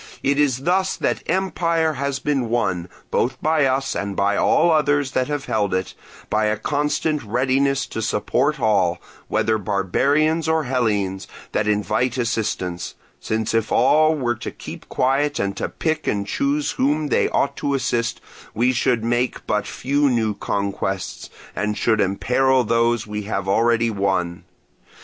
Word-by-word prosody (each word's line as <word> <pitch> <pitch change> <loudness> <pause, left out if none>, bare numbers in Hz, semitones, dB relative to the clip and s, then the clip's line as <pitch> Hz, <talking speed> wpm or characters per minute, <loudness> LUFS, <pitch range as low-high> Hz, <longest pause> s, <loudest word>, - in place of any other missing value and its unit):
It 140 +1 +2
is 135 -3 +1
thus 185 +3 +1
that - - -1
empire 170 -3 +1
has 140 -1 -2
been 135 -5 -1
won, 95 -7 -1 0.2
both 125 - 0
by 155 -2 +2
us 135 +1 0
and 100 0 -3
by 100 +1 +1
all 170 +10 +3
others 145 -3 +2
that 130 -1 0
have 145 -1 -3
held 100 -4 0
it, 95 -1 -2 0.3
by 110 0 +1
a 105 0 +1
constant 150 +4 -1
readiness 130 +4 +1
to 110 - -5
support - - 0
all, 95 -5 +2 0.3
whether 110 0 +1
barbarians 140 - +1
or 160 0 +2
Hellenes, 105 -7 -1 0.2
that 105 - 0
invite 110 +4 0
assistance; 110 -7 -2 0.2
since 110 0 -2
if 115 -1 0
all 155 +5 +4
were 125 -5 0
to 110 - -6
keep - - -10
quiet 140 +3 +1
or 100 - 0
to - - -4
pick 155 -1 -2
and 100 -1 0
choose 140 +7 0
whom 150 +2 0
they - - +2
ought 140 - 0
to 140 -1 -1
assist, 120 -3 -1 0.4
we 120 +3 +3
should 120 -2 +1
make 120 +2 -1
but 105 0 -1
few 140 +2 +1
new 115 -4 +1
conquests, 100 -1 -3 0.3
and 105 0 -1
should 110 -2 +2
imperil 125 +7 +2
those 115 0 +1
we 105 0 -4
have 100 -3 -3
already 115 +3 +2
won. 95 -4 -1
120 Hz, 155 wpm, -21 LUFS, 105-140 Hz, 0.4 s, all